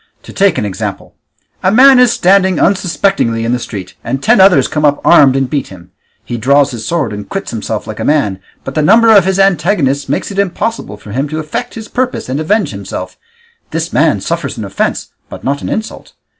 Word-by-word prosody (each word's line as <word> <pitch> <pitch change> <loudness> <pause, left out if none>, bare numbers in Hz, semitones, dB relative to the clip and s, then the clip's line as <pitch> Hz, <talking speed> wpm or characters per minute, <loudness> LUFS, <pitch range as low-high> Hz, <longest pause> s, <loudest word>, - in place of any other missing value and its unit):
To - - -12
take 195 -5 +2
an - - -1
example: 95 -2 -5 0.5
a 185 - +2
man 260 +3 +6
is 250 -2 +5
standing 190 -3 +2
unsuspectingly 180 - 0
in 115 - -1
the 125 - -1
street 95 -6 -7
and 125 +3 -2
ten 190 - +4
others 190 -1 +5
come 150 - -3
up 145 -1 +2
armed 140 -6 +6
and 135 -1 0
beat 140 +1 -3
him; 90 -2 -14 0.3
he 120 - -4
draws 140 +4 +2
his 115 -2 -6
sword 150 -10 -1
and 105 0 -8
quits 195 0 -5
himself 110 -1 -4
like 110 - -8
a - - -3
man, 105 -11 0 0.2
but 135 - -6
the 155 - 0
number 225 +6 +5
of 195 -3 +5
his 190 0 0
antagonists 170 -7 +1
makes - - -2
it 200 - -4
impossible 200 - -2
for 105 0 -12
him 135 +6 -2
to 155 - -4
effect 160 +10 -5
his 225 -1 -8
purpose 255 - -3
and 135 +3 -2
avenge 205 +7 0
himself; - - -7 0.5
this 165 +2 -4
man 155 -1 +2
suffers 165 -4 -3
an 110 - -5
offence 100 - -3 0.2
but - - -10
not 140 +2 -2
an - - -5
insult. 220 0 -5
155 Hz, 210 wpm, -13 LUFS, 125-195 Hz, 0.5 s, man